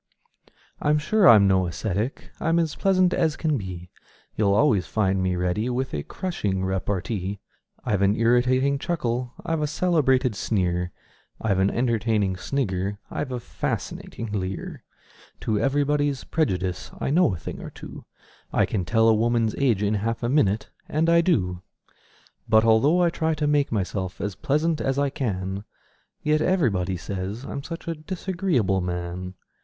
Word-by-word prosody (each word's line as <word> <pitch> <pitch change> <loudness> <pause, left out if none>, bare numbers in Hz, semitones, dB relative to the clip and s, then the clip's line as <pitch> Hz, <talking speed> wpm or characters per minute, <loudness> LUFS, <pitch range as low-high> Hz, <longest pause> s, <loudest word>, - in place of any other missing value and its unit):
I'm 150 +1 +3
sure 185 +6 +4
I'm 105 -3 +8
no 95 -1 +3
ascetic: 100 - -3
I'm 165 +1 +1
as 165 -3 +1
pleasant 185 -2 +2
as 160 -3 +1
can 155 -2 0
be; 90 -5 -6 0.4
You'll 100 -2 +2
always 105 -6 +3
find 95 -3 +1
me 90 -1 0
ready 90 +6 0
with 130 +1 -2
a 75 - -1
crushing 100 - -3
repartee; 95 +1 -2 0.5
I've 100 -2 +1
an 100 +1 +3
irritating 125 +4 +3
chuckle; 125 -7 -2
I've 165 -1 -1
a 150 - +1
celebrated 140 -7 +2
sneer; 90 -4 -1 0.5
I've 100 -4 0
an 95 +1 +3
entertaining 115 -5 +1
snigger; 100 -3 -2
I've 135 - -3
a 125 - -2
fascinating 115 -1 -4
leer; 95 -2 -4 0.6
To 110 -2 0
everybody's 145 +2 +1
prejudice 90 - -1
I - - -1
know 165 - +3
a - - -5
thing 80 - -7
or - - -7
two; - - -10 0.5
I - - +3
can 95 -5 -2
tell 110 +4 +3
a 115 - +6
woman's 115 0 +1
age 120 -8 +2
in 105 +1 +1
half 115 +3 -2
a 120 - 0
minute 110 -7 +1 0.2
and 160 +2 +2
I 170 0 +6
do 90 - 0 0.9
But 110 0 +5
although 140 +11 +4
I 170 - +3
try 160 -1 0
to 150 0 -1
make 145 -1 +2
myself 95 -3 -2
as 100 0 -2
pleasant 155 - 0
as 135 0 0
I 140 -1 +1
can, 95 -6 -3 0.6
Yet 155 0 +2
everybody 100 - +1
says 100 +6 -5
I'm 140 - -5
such 165 +4 -8
a 165 - 0
disagreeable 165 - -1
man! 90 +1 -4
115 Hz, 160 wpm, -25 LUFS, 95-150 Hz, 0.9 s, I'm